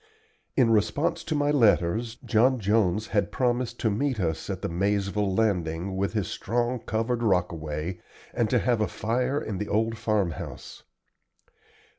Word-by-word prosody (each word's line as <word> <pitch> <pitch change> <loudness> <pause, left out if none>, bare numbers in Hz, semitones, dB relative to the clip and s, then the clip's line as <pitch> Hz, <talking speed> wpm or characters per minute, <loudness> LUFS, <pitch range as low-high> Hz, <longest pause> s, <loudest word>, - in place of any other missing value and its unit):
In 120 -4 +5
response 140 +10 +1
to 155 - -1
my 145 0 +2
letters 115 -3 +2
John 120 +3 +3
Jones 105 0 +1
had 100 -4 0
promised 120 -1 0
to 110 - +2
meet 130 +3 -1
us 80 -2 -2
at 95 -3 -4
the - - 0
Maizeville 100 +2 0
Landing 95 -4 0
with 100 +2 -1
his 105 -4 -1
strong 120 +3 -1
covered 115 +2 -1
rockaway, 85 -4 -1 0.3
and 115 -3 +1
to 125 - +3
have 115 +1 +1
a 105 - +2
fire 125 +5 -1
in 100 -8 -4
the 105 - -3
old 115 +2 0
farmhouse. 105 -8 -2
110 Hz, 150 wpm, -26 LUFS, 95-120 Hz, 0.3 s, In